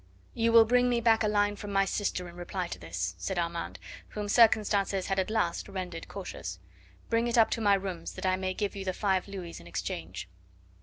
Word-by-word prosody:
"You 230 0 +2
will 230 -1 +8
bring 250 +2 +3
me 240 -1 +2
back 225 -1 +4
a 215 - +3
line 205 0 +2
from 205 0 -7
my 195 0 +3
sister 195 -3 -2
in 170 - -11
reply 180 +1 -3
to - - -6
this," 85 +1 -3
said 190 - -3
Armand, 170 -1 -2 0.3
whom 210 -1 -5
circumstances 205 -4 +4
had 195 0 0
at 190 - 0
last 215 -4 0
rendered 180 -4 -5
cautious. - - -6 0.5
"Bring 230 +1 +2
it 240 +1 0
up 225 - +5
to 230 - -1
my 205 -2 +5
rooms 190 -4 -4
that - - -6
I 185 0 +3
may 185 0 -2
give 205 0 -2
you 195 - -4
the 185 -1 -1
five 190 -1 0
louis 185 -4 -7
in 85 - -13
exchange." 85 - -5
195 Hz, 215 wpm, -29 LUFS, 180-215 Hz, 0.5 s, will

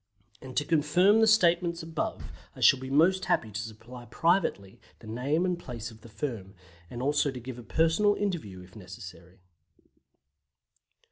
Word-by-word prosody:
And 130 -1 -9
to 145 - +1
confirm 165 +7 +3
the 225 - +5
statements 175 -5 +3
above, 160 -1 -4 0.2
I - - -12
shall 135 - +6
be 130 0 -7
most 170 +7 +3
happy 110 - 0
to 105 +2 -4
supply 115 +2 -10
privately 165 - 0 0.2
the - - -16
name 135 +10 -1
and 180 -1 -1
place 120 -6 -7
of 110 -1 -16
the 115 - -14
firm, 105 -3 -6 0.3
and 120 +1 -6
also 145 +1 +2
to 130 -2 -6
give 125 0 -8
a - - -10
personal 165 - +2
interview 160 - -4
if 90 0 -16
necessary. 95 -2 -12
130 Hz, 160 wpm, -28 LUFS, 110-170 Hz, 0.3 s, shall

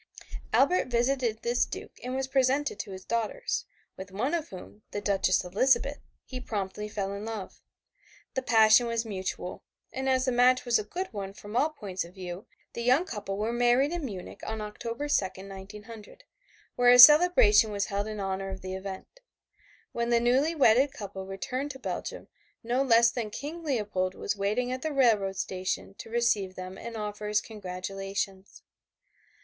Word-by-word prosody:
Albert 285 +5 +3
visited 240 -2 0
this 240 +1 +2
Duke - - -7
and 250 +1 -3
was 265 0 -1
presented 265 -2 +1
to - - -5
his 190 0 -9
daughters, 235 - -2 0.3
with 190 +1 -8
one 235 - -1
of 330 -2 -2
whom, 190 +3 -11
the 205 - -4
Duchess 195 -2 +1
Elizabeth, 260 +9 +2 0.3
he 255 - -6
promptly 210 -3 -4
fell 200 -2 -3
in 200 +1 -6
love. 220 -3 -6 0.7
The 260 - -1
passion 225 -1 +5
was 230 0 -1
mutual, 190 -3 -5 0.3
and 265 0 -2
as 260 0 +2
the 255 - +1
match 250 +1 +4
was 240 -2 +3
a - - -3
good 355 - -5
one 195 -2 -5
from 205 +2 -10
all 290 +5 +3
points 200 -11 -5
of 170 +3 -13
view 185 +3 -7 0.3
the 235 - -5
young 255 +8 +3
couple 205 - -5
were 220 +3 -1
married 245 +4 +3
in 345 -2 -3
Munich 195 -9 -7
on 220 0 -4
October 230 +6 -5
2, 290 - +3
1900, 205 - -10 0.5
where 245 0 +4
a 245 - +8
celebration 295 -6 +8
was 200 -1 -1
held 200 +1 -2
in 215 -1 -5
honor 195 0 -3
of 190 0 -7
the 185 0 -5
event. 190 - -7 0.7
When 235 0 -2
the 235 -1 +4
newly 265 +7 +2
wedded 270 0 +4
couple 195 -5 -7
returned 255 +9 -4
to 265 - -11
Belgium - - -5 0.4
no 240 +3 0
one 270 -1 0
less 235 0 +6
than 235 -3 -3
King 300 +9 -6
Leopold 210 -10 -1
was - - -2
waiting 210 +5 -1
at 255 0 -3
the 315 - -2
railroad 220 -8 +3
station 185 +1 -3
to - - -8
receive 220 -5 +1
them 185 0 -7
and 230 +2 -7
offer 210 0 -5
his 210 0 +2
congratulations. 195 -1 -5
220 Hz, 175 wpm, -28 LUFS, 195-255 Hz, 0.7 s, a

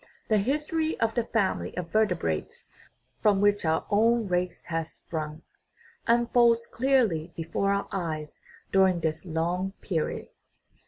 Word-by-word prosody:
The 215 -1 +4
history 305 +7 -1
of 225 0 +1
the 235 -1 0
family 225 -5 -1
of 175 -2 -4
vertebrates, 180 - 0 0.5
from 205 -2 +4
which 205 0 +3
our 160 0 +1
own 225 +2 +3
race 180 -1 -1
has 165 -1 -3
sprung, 155 -1 -6 0.6
unfolds 235 0 +4
clearly 230 - +1
before 165 +4 -1
our 200 0 0
eyes 155 -5 -4 0.3
during 190 -3 +4
this 160 +3 -2
long 175 +4 -1
period. 165 -6 -2
195 Hz, 125 wpm, -27 LUFS, 165-230 Hz, 0.6 s, The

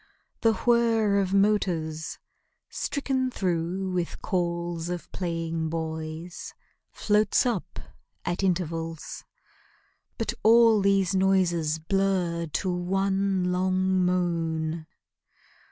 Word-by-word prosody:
The 225 -1 +4
whir 225 -4 +3
of 190 -1 0
motors, 180 -6 +1 0.5
stricken 265 -3 -1
through 185 -2 -2
with 175 -2 -2
calls 170 -2 -2
Of 175 -1 -5
playing 165 -2 -2
boys, 160 +1 -5 0.4
floats 210 +1 +2
up 235 -7 -2 0.5
at 175 +2 -1
intervals; 165 -3 -2 0.9
But - - -2
all 225 -1 +6
these 195 -1 +2
noises 180 -5 +2
blur 175 -1 0
to 180 +4 -1
one 190 +1 0
long 185 0 +1
moan. 165 -3 -1
180 Hz, 90 wpm, -26 LUFS, 165-195 Hz, 0.9 s, all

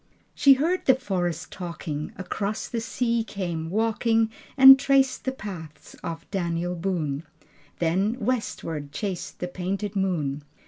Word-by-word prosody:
II - - -37
She 280 -2 +7
heard 330 +7 0
the 260 - +6
forest 180 - -2
talking, 160 -4 -5
Across 200 +3 -3
the 230 - -2
sea 235 0 0
came 175 -7 -4
walking, 225 +2 +1 0.3
And 270 0 +11
traced 275 -1 +2
the 260 - +1
paths 170 - -9
of 165 0 -5
Daniel 175 -2 -1
Boone, 165 -6 -2 0.6
Then 190 +8 +1
westward 165 - -2
chased 190 +2 -4
the 180 - -3
painted 190 +3 -3
moon. 160 -8 -1
195 Hz, 135 wpm, -25 LUFS, 170-230 Hz, 0.6 s, And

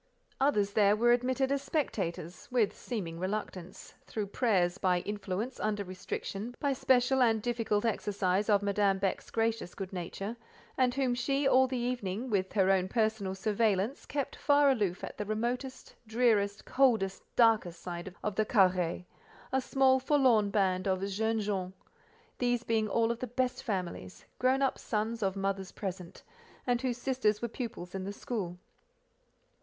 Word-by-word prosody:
Others 210 -8 +2
there 205 -1 +4
were 240 +2 +4
admitted 260 +2 +1
as 280 -1 +1
spectators—with 200 - -2
(seeming) 175 -9 -5
reluctance, 190 -1 -5
through 215 -2 -3
prayers, 195 -4 +1
by 180 -2 +2
influence, 205 +4 -4
under 210 -1 -1
restriction, 195 +4 -5
by 285 -2 +1
special 260 0 +3
and 225 -3 +4
difficult 225 -2 -1
exercise 205 -2 0
of 205 -1 +4
Madame 200 -1 +2
Beck's 195 -1 -2
gracious 225 -5 -1
good 190 -1 -6
nature, 195 +5 -5 0.4
and 250 -2 +2
whom 265 -3 +1
she 275 +3 0
all 260 0 +5
the 255 0 -3
evening—with 220 -4 -2
her 195 -2 +4
own 185 -1 +2
personal 215 -3 0
surveillance—kept 215 +7 -1
far 285 -1 +4
aloof 200 -8 -1
at - - -7
the 210 - -2
remotest, 245 +4 -3
drearest, 215 -3 +2
coldest, 225 -8 +2
darkest 220 -8 +3
side 175 +1 -6
of 210 - -1
the 215 - +2
carré—a 185 +7 0
small, 265 0 +3
forlorn 255 -6 +3
band 190 -2 +1
of 190 +1 0
"jeunes 220 +2 -1
gens;" 190 -3 -2 0.7
these 245 -1 +1
being 220 -2 +1
all 230 +2 +2
of 235 - -4
the 255 - -3
best 255 +2 -1
families, 180 - -4
grown 260 +2 +3
up 270 - 0
sons 225 +1 -2
of 195 -1 0
mothers 195 -1 -2
present, 185 -3 -6 0.4
and 245 -1 +1
whose 250 -2 -1
sisters 245 -5 +1
were 235 - -2
pupils 225 -7 -6
in 190 -1 -4
the 195 - -4
school. 200 -4 -4
215 Hz, 150 wpm, -31 LUFS, 190-245 Hz, 0.7 s, all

